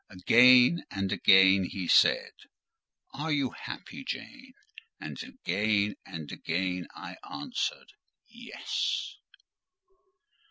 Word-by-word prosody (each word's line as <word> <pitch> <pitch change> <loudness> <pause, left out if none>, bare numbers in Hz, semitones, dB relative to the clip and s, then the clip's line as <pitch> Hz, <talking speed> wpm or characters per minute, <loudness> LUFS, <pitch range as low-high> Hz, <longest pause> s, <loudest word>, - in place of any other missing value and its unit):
Again 125 - +5
and 95 -1 -3
again 95 0 +5
he 90 0 -5
said, - - +3 0.8
"Are 155 +3 -4
you 140 -4 0
happy, 265 +2 -9
Jane?" 260 0 -8 0.5
And - - -8
again 105 - -1
and 80 -6 -8
again 90 +1 -3
I - - -9
answered, - - -5 0.3
"Yes." 240 +1 -4
105 Hz, 90 wpm, -28 LUFS, 95-160 Hz, 0.8 s, Again